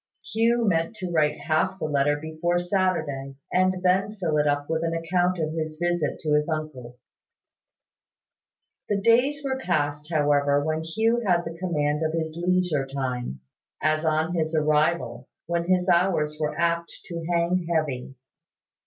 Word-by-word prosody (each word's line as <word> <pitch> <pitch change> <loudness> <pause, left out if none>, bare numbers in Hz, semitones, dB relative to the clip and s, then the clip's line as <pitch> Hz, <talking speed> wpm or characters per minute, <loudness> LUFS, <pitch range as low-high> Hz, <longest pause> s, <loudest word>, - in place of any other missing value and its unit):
Hugh 230 +1 +2
meant 165 +2 +1
to 185 -4 -5
write 150 -2 +1
half 170 +4 0
the 160 - -3
letter 145 -1 +2
before 160 +3 -1
Saturday, 170 -7 -1 0.2
and 185 0 +2
then 190 +3 +2
fill 160 -5 0
it 150 0 +2
up 145 0 0
with 160 0 -1
an 165 0 -1
account 175 +2 +1
of 155 -1 -2
his 155 -1 -4
visit 175 -3 0
to 150 -1 0
his 150 +2 +2
uncle's. 150 -6 -5 1.9
The 205 -1 +1
days 250 +7 +3
were 265 -1 -1
passed, 150 - -1
however, 145 -2 +2
when 155 0 -1
Hugh 220 +9 +1
had 175 -4 +2
the 165 0 -6
command 150 -4 -1
of 160 0 0
his 160 -1 -2
leisure 175 -5 +1
time, 125 - -4 0.4
as 155 0 +1
on 160 +1 +1
his 160 -1 -1
arrival, 150 -4 +1 0.2
when 170 0 -1
his 180 0 +2
hours 170 -4 +2
were 150 -1 -2
apt 170 0 +1 0.2
to 170 -1 -6
hang 170 +1 +1
heavy. 140 -5 -1
165 Hz, 155 wpm, -25 LUFS, 150-180 Hz, 1.9 s, days